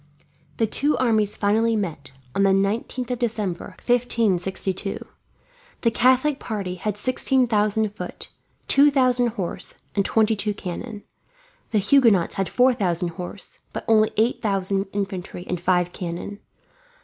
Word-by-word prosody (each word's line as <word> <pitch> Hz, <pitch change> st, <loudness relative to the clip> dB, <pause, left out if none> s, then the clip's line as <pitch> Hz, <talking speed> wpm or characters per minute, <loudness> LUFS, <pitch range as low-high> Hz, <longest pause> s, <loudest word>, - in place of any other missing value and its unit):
The 225 Hz, -, +2 dB
two 285 Hz, +7 st, +1 dB
armies 220 Hz, -4 st, +1 dB
finally 220 Hz, +3 st, +2 dB
met, 165 Hz, -9 st, -4 dB, 0.2 s
on 195 Hz, -, 0 dB
the 195 Hz, -, +5 dB
19th 210 Hz, +6 st, 0 dB
of 245 Hz, -, -2 dB
December, 215 Hz, -7 st, -3 dB
1562. 195 Hz, -5 st, 0 dB, 0.8 s
The 230 Hz, -, +2 dB
Catholic 260 Hz, +5 st, +3 dB
party 200 Hz, -5 st, -4 dB
had 205 Hz, +3 st, -3 dB
sixteen 255 Hz, +2 st, +2 dB
thousand 215 Hz, -1 st, +1 dB
foot, -, -, -7 dB, 0.4 s
two 285 Hz, +1 st, +6 dB
thousand 255 Hz, -3 st, +3 dB
horse, 190 Hz, -7 st, -5 dB, 0.2 s
and 200 Hz, -, +1 dB
twenty 220 Hz, +2 st, +2 dB
two 210 Hz, 0 st, -2 dB
cannon; 205 Hz, +4 st, -6 dB, 0.7 s
the 220 Hz, -, +1 dB
Huguenots 210 Hz, -4 st, +4 dB, 0.2 s
four 255 Hz, +1 st, +4 dB
thousand 180 Hz, -6 st, -1 dB
horse, 180 Hz, +3 st, -7 dB
but -, -, -5 dB
only 220 Hz, -1 st, +4 dB
eight 225 Hz, +3 st, +1 dB
thousand 195 Hz, -2 st, 0 dB
infantry 190 Hz, -3 st, -4 dB
and 180 Hz, -1 st, -3 dB
five 180 Hz, -1 st, +1 dB
cannon. 180 Hz, +3 st, -5 dB
210 Hz, 135 wpm, -23 LUFS, 190-235 Hz, 0.8 s, two